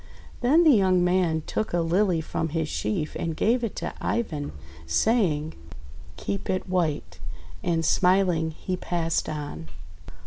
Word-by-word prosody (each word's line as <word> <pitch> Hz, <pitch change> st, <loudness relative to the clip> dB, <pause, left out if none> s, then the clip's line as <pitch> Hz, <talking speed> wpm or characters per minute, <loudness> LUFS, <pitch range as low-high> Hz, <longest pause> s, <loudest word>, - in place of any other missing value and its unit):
Then 290 Hz, +8 st, +4 dB
the 315 Hz, -, +7 dB
young 190 Hz, -6 st, +4 dB
man 180 Hz, -3 st, +2 dB
took 215 Hz, -, -2 dB
a 175 Hz, -, +2 dB
Lily 175 Hz, +1 st, +2 dB
from 160 Hz, 0 st, -3 dB
his 160 Hz, 0 st, -1 dB
sheaf 160 Hz, -1 st, -2 dB
and 165 Hz, -1 st, -2 dB
gave 240 Hz, +3 st, +2 dB
it 225 Hz, -, -2 dB
to -, -, -4 dB
Ivan, 155 Hz, -11 st, -2 dB, 0.4 s
saying: 160 Hz, -, +1 dB, 0.3 s
— 70 Hz, +1 st, -17 dB
"Keep 200 Hz, -, -4 dB
it 185 Hz, +1 st, -1 dB
white 175 Hz, -5 st, -1 dB, 0.2 s
!>: -, -, -18 dB
And, 165 Hz, -2 st, 0 dB
smiling, 180 Hz, -3 st, +3 dB
he 180 Hz, +3 st, -4 dB
passed 170 Hz, -2 st, -1 dB
on. 145 Hz, -, -5 dB
175 Hz, 150 wpm, -26 LUFS, 160-195 Hz, 0.4 s, the